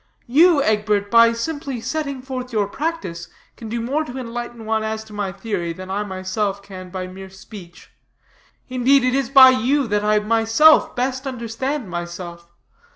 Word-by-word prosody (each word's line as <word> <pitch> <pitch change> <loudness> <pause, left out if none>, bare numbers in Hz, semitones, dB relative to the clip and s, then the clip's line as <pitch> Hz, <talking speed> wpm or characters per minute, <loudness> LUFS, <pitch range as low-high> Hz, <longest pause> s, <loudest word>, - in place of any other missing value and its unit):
You, 300 +3 +4
Egbert, 210 -2 0
by 230 0 +6
simply 275 +2 -4
setting 280 0 -4
forth 255 -1 -6
your 215 -3 +1
practice, 275 - -4 0.3
can 225 - -9
do 235 +2 -3
more 270 +7 -1
to 250 -1 -8
enlighten 240 -2 -6
one 220 0 0
as 220 0 -3
to 220 -1 -15
my 205 -2 -3
theory, 195 -4 -4
than 185 +2 -9
I 205 +2 -1
myself 195 +1 -3
can 185 -2 -10
by 185 0 -5
mere 190 +1 -10
speech. 190 -2 -13 0.8
Indeed, 255 +1 +3
it 255 0 +1
is 270 -2 0
by 265 -1 +9
you 260 +3 +1
that 205 0 0
I 210 0 +3
myself 225 +8 +4
best 260 +2 -2
understand 255 +1 -4
myself. 175 0 -7
225 Hz, 165 wpm, -21 LUFS, 200-260 Hz, 0.8 s, by